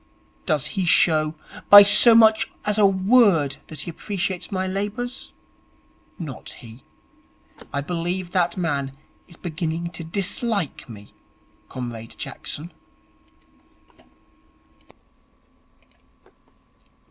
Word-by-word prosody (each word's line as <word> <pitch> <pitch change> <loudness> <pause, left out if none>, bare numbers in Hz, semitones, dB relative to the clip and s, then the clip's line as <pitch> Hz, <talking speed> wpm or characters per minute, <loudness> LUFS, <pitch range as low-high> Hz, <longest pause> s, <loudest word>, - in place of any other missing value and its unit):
Does 150 -4 0
he 195 -3 -1
show 155 -2 +3 0.3
by 205 0 +11
so 225 +3 +6
much 220 -1 +5 0.2
as 210 0 0
a 205 - +6
word 190 - +3
that 155 -2 -6
he 170 - -5
appreciates 190 0 -4
my 190 -1 -2
labours? 205 +7 -4 0.9
Not 150 -7 -8
he. 115 +2 -13 0.9
I 140 - -2
believe 175 +3 -3
that 175 -2 0
man 140 -6 -3 0.3
is 170 - -17
beginning 170 0 -4
to 165 0 -7
dislike 195 - -2
me, 105 -2 -13 0.6
Comrade 120 -3 -7
Jackson.' 165 +4 -6
175 Hz, 95 wpm, -22 LUFS, 150-200 Hz, 0.9 s, by